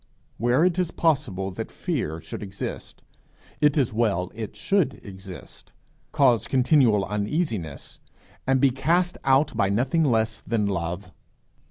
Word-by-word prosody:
Where 120 - +3
it 180 0 +1
is 180 -3 +1
possible 125 - 0
that - - -6
fear 80 +2 -3
should - - -8
exist, 95 -1 -6 0.6
it 150 0 +4
is 130 -6 +1
well 100 -6 0
it 110 -1 -6
should 150 - 0
exist, 95 -2 -11 0.4
cause 120 -5 +3
continual 125 -6 +3
uneasiness, 105 - -3 0.5
and 135 0 +3
be 135 0 +4
cast 170 +7 +1
out 135 +3 +3
by 100 - +2
nothing 130 +10 +1
less 110 -5 +1
than 110 -2 -1
love. 90 0 -3
115 Hz, 135 wpm, -25 LUFS, 100-140 Hz, 0.6 s, it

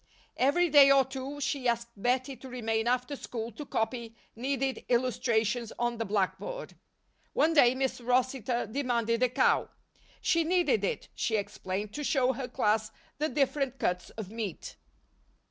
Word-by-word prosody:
Every 295 +7 +3
day 285 -3 +8
or 275 -1 +6
two 265 +2 -6
she 275 -2 -1
asked 235 0 0
Bettie 255 +5 0
to 260 +3 -11
remain 225 -2 -1
after 250 +3 0
school 230 -3 -5
to 275 +7 -9
copy 225 0 -2 0.2
needed 265 +2 -2
illustrations 235 -2 +1
on 240 -1 -1
the 225 - -1
blackboard. 210 - -2 0.6
One 325 +2 +3
day, 255 -5 +6
Miss 265 -1 -1
Rossitor 250 -1 0
demanded 235 -1 0
a 255 - +4
cow. 250 - +2 0.5
She 335 -2 +2
needed 325 - +2
it, 195 - -2
she 220 - -1
explained, 205 0 -4
to 295 - -4
show 265 -2 +2
her 255 0 -4
class 220 -3 +1 0.3
the 305 +1 +1
different 275 -2 0
cuts 180 -6 -1
of 210 -3 -8
meat. 220 -6 -5
250 Hz, 150 wpm, -29 LUFS, 225-270 Hz, 0.6 s, day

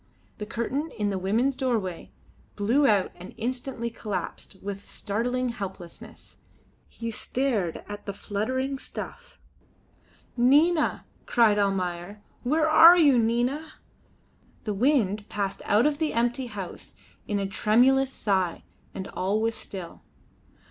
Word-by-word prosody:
The 210 - -5
curtain 260 +7 -2
in 205 -2 0
the 190 - -2
women's 230 +8 +1
doorway 225 -10 -2 0.5
blew 240 +8 +3
out 205 -4 +3
and 180 +2 -12
instantly 245 -1 -3
collapsed 210 -3 -5
with 200 0 -6
startling 245 +4 -2
helplessness. 190 -6 -9 0.5
He 230 0 -6
stared 225 -7 -1
at 205 0 -8
the 200 - -3
fluttering 260 +8 -2
stuff. - - -9 1.0
"Nina!" 295 +7 +3 0.2
cried 220 -3 +4
Almayer. 195 0 -2 0.2
"Where 310 +5 +2
are 325 +3 +9
you, 285 -7 +5
Nina?" 245 +7 0 0.9
The 215 - -2
wind 215 -3 +1
passed 200 -2 -3
out 210 +5 +4
of 300 -1 +1
the 315 -2 0
empty 240 +2 0
house 200 -6 -8 0.3
in 205 - 0
a 200 - -1
tremulous 255 +7 +3
sigh, 190 -8 -1 0.3
and 190 - -5
all 195 +3 -1
was 225 +1 0
still. 185 -5 -8
225 Hz, 125 wpm, -26 LUFS, 200-260 Hz, 1.0 s, are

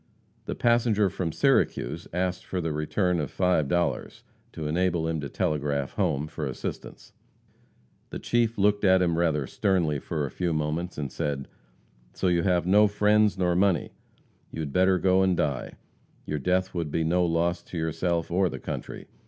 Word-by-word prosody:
The - - -4
passenger 115 -4 +2
from 90 -4 -3
Syracuse 135 - +1
asked 90 +1 -2
for 95 - -4
the 80 -2 -2
return 90 +4 0
of 75 -4 -3
$5, 85 -2 0 0.3
to 80 -2 -4
enable 85 0 0
him 80 -2 -2
to 70 - -5
telegraph 70 -1 -1
home 70 +2 0
for 75 -1 -5
assistance. 65 - -7 1.0
The - - -5
chief 115 -1 0
looked 105 +1 +2
at 95 -1 +5
him 85 -2 +1
rather 80 -4 +1
sternly 85 -4 0
for 75 0 -3
a 65 - -6
few 85 -2 -1
moments, 80 +3 -2
and 70 -3 -4
said: 70 -2 -3 0.7
"So, 95 - 0
you 85 -1 +2
have 90 -2 +1
no 105 +3 +5
friends 105 0 +3
nor 90 -2 +1
money. 95 -1 +2 0.6
You 80 - -5
had 70 -3 -5
better 95 0 +4
go 95 +1 +3
and 95 -2 +2
die. 70 -5 -1 0.5
Your 75 - -3
death 90 +5 0
would 85 -4 -2
be 80 +3 0
no 90 +3 +2
loss 85 +1 0
to 90 - -9
yourself 85 +1 -1
or 95 +1 +2
the 65 - -6
country. - - -6
85 Hz, 170 wpm, -26 LUFS, 75-95 Hz, 1.0 s, at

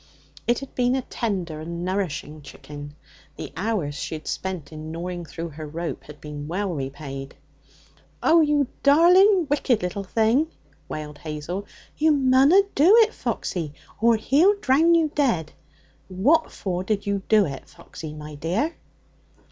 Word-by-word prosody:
It 240 0 +3
had 275 - -9
been 250 0 +1
a 265 - -1
tender 185 -11 -3
and 170 +2 -5
nourishing 160 -5 -3
chicken; 145 0 -10 0.4
the - - -8
hours 185 -5 -1
she 140 +3 -4
had 155 - -9
spent 185 -6 -4
in 155 0 -7
gnawing 175 +1 -5
through 165 +1 -6
her 155 0 -8
rope 165 +2 -5
had 150 0 -12
been 150 -1 -7
well 185 +3 -2
repaid. 135 -1 -6 0.9
'Oh! 330 0 +6
you 295 -3 +2
darlin' 355 +6 +6
wicked 270 -6 +1
little 180 +3 -3
thing!' 225 +9 +2 0.4
wailed 150 -1 -6
Hazel. 160 +6 -5 0.3
'You 310 0 +4
munna 275 +7 +5
do 340 +10 +6
it, 445 0 +3
Foxy, 155 -5 -3 0.3
or 230 0 +5
he'll 305 - +4
drown 325 -1 +4
you 320 -3 +2
dead. 225 - +1 0.6
What 265 - +2
for 185 -2 -3
did 205 +1 -1
you 200 -1 -1
do 215 -2 +5
it, 135 -4 -7
Foxy, 155 -2 -10
my 150 0 -9
dear?' 180 - -1
190 Hz, 150 wpm, -24 LUFS, -, 0.9 s, Oh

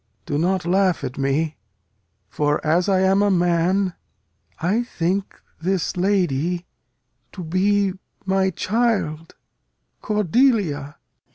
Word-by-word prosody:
Do 145 - -1
not 185 +1 0
laugh 185 0 +2
at 130 - -5
me; 150 +3 0 0.7
For 145 +8 0
(as 175 +5 +2
I 190 -1 +3
am 190 +1 +3
a 205 - +3
man) 180 +1 +2 0.7
I 195 +8 +1
think 195 -4 -2 0.2
this 185 0 -1
lady 175 -3 0 0.7
To 185 - -7
be 195 +3 +1 0.3
my 190 0 +2
child 190 -6 -1 0.7
Cordelia. 205 - +1
185 Hz, 105 wpm, -22 LUFS, 165-200 Hz, 0.7 s, I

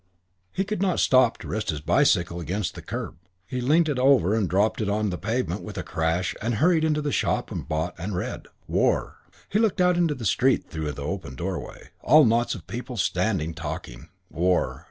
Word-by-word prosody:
He 195 - -1
could 205 -1 -3
not 190 -3 +1
stop 130 -3 +4
to - - -10
rest 110 0 -3
his 75 - -1
bicycle 85 +3 +2
against 90 +4 -3
the - - -9
curb. 80 - -6 0.3
He 125 +4 -4
leant 155 +6 +3
it 145 -4 -1
over 130 -8 +4
and 110 -4 +1
dropped 105 +4 +1
it 105 - -1
on 105 0 0
the 90 - -3
pavement 115 +5 -2
with - - -8
a - - -3
crash 80 +3 -1
and 115 +2 -1
hurried 160 - +3
into 150 -1 +1
the 145 - -1
shop - - 0
and - - -5
bought 80 +3 -1
and 95 +3 -4
read. 90 - -4 0.2
War.... - - +1 0.3
He 210 - 0
looked 220 -4 +1
out 180 -1 +4
into 165 -4 +2
the 120 - -7
street 130 +7 +2
through 80 -3 -4
the 70 - -7
open 80 -4 -5
doorway. - - -6
All 155 +4 +6
those 120 - +4
knots 120 +1 +1
of 90 - -10
people 125 +1 -6
standing 90 -3 0
talking. - - -7 0.2
War.... 90 +2 +1
110 Hz, 210 wpm, -25 LUFS, 90-140 Hz, 0.3 s, All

